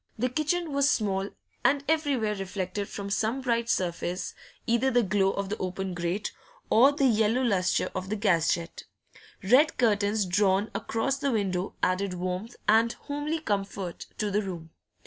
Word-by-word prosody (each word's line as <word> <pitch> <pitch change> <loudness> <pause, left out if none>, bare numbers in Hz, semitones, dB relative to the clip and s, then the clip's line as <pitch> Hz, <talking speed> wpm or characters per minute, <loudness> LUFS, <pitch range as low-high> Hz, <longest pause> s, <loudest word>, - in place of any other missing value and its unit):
The 250 +3 0
kitchen 310 +4 -1
was 280 0 +3
small, 195 -4 0 0.3
and 280 +1 +3
everywhere 280 -9 +1
reflected 195 0 -4
from 200 -1 -6
some 225 +6 0
bright 235 -2 0
surface 175 0 -1 0.3
either 235 +3 +2
the 245 -2 +3
glow 195 -1 +2
of 195 0 -3
the 215 - -2
open 185 0 -3
grate 175 +4 -2 0.4
or 255 +6 +7
the 285 -1 +1
yellow 225 +1 +3
lustre 190 -6 +1
of 185 0 -4
the 215 - -1
gas 190 -6 +2
jet; 170 -1 -8 0.6
red 255 +10 +4
curtains 210 -3 +2
drawn 195 +2 +2
across 260 +5 -1
the 280 -1 0
window 195 -4 -1
added 185 0 +1
warmth 185 +6 -4
and 225 +2 +4
homely 290 +2 -3
comfort 195 - -3
to 210 -1 -1
the 205 +2 +2
room. 170 -5 -7
210 Hz, 160 wpm, -28 LUFS, 190-245 Hz, 0.6 s, or